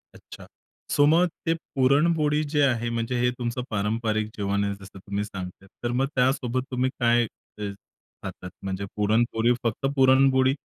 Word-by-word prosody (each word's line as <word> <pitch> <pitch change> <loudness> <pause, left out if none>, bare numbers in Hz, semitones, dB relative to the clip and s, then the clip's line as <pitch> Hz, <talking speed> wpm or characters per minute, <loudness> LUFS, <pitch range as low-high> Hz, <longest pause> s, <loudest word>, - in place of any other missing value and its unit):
अच्छा, - - -13 0.4
सो 145 - +4
मग 170 +4 +5 0.2
ते 165 - +3 0.2
पुरणपोळी 150 +3 +3
जे 145 - +3
आहे, 120 -3 +1
म्हणजे 115 +1 -2
हे 125 0 +3
तुमचं 120 +1 -2
पारंपरिक 110 +1 -1
जेवण 100 0 0
आहे, 100 0 -1
जसं 95 -1 -13
तुम्ही 100 +2 -3
सांगताय, 95 -1 -8 0.2
तर 120 - 0
मग 135 - +3
त्यासोबत 130 -1 +1
तुम्ही 130 +1 +1
काय 120 0 +4 0.4
अ, - - -4 0.6
खातात? 90 - -7
म्हणजे 95 0 -3
पुरणपोळी 115 +3 +2
फक्त 115 +3 -1
पुरणपोळी? 130 0 +5
120 Hz, 150 wpm, -25 LUFS, 105-130 Hz, 0.6 s, मग